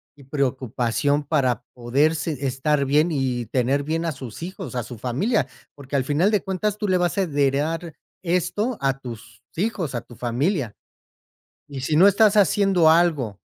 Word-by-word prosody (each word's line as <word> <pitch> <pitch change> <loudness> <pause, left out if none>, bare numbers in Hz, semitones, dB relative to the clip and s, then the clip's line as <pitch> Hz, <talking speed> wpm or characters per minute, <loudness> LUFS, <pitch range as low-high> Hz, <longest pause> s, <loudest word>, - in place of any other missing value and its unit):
y 140 - -16
preocupación 135 +1 0
para 135 -5 +1
poder 135 +6 +1
se 150 -3 -3
estar 140 +2 0
bien 150 +5 +3
y 130 -4 -1
tener 130 +5 0
bien 160 +3 -2
a 165 - 0
sus 130 -3 -9
hijos, 180 -6 -7
a 120 - -1
su 120 +1 -9
familia, 150 - 0 0.3
porque 140 -1 -7
al 130 - +1
final 155 +9 +2
de 210 -3 +1
cuentas 195 +2 -2
tú 210 -1 -2
le 185 - +3
vas 175 +2 0
a 195 - +3
heredar 150 +2 0 0.3
esto 205 +7 0
a 135 -1 +1
tus 115 -3 -10 0.2
hijos, 180 - -2
a 120 - -2
tu 120 - -15
familia. 125 - -1 0.9
Y 140 -2 -7
si 145 +4 -1
no 180 +6 +7
estás 210 +1 +4
haciendo 195 -4 +4
algo 150 - +1
145 Hz, 175 wpm, -23 LUFS, 130-175 Hz, 0.9 s, no